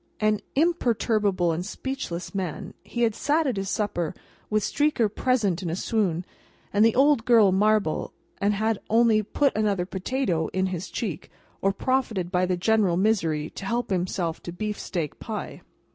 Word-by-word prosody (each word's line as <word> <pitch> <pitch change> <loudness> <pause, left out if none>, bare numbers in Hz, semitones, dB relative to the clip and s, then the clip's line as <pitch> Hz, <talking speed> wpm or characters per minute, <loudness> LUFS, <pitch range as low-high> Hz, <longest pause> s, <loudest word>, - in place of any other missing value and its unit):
An 215 -1 +2 0.2
imperturbable 220 - +2
and 165 +2 -2
speechless 180 -6 -5
man, 185 -5 -4
he 240 - -2
had 225 -2 +3
sat 300 +8 +1
at 260 -5 0
his 195 -1 -3
supper, 175 -7 -1 0.3
with 215 -1 +1
Streaker 290 -5 +2
present 215 -10 +1
in 175 - -3
a 165 - -1
swoon, 185 -5 0 0.5
and 205 +1 +4
the 225 0 +4
Odd 275 -2 +4
Girl 225 -5 +5
marble, 205 -3 +2 0.3
and 200 +1 +2
had 220 0 0
only 225 -1 +4
put 275 +7 +1
another 205 -4 +1
potato 190 - -1
in 190 0 +1
his 180 +1 -5
cheek, 190 -10 -4 0.3
or 195 - +3
profited 215 -5 -1
by 180 -1 +2
the 180 -1 0
general 200 -2 +2
misery 165 -7 +1
to - - -8
help 235 +3 -2
himself 180 -2 -1
to 175 - -6
beefsteak 175 -5 -4
pie. 220 -3 -6
205 Hz, 160 wpm, -25 LUFS, 180-230 Hz, 0.5 s, Girl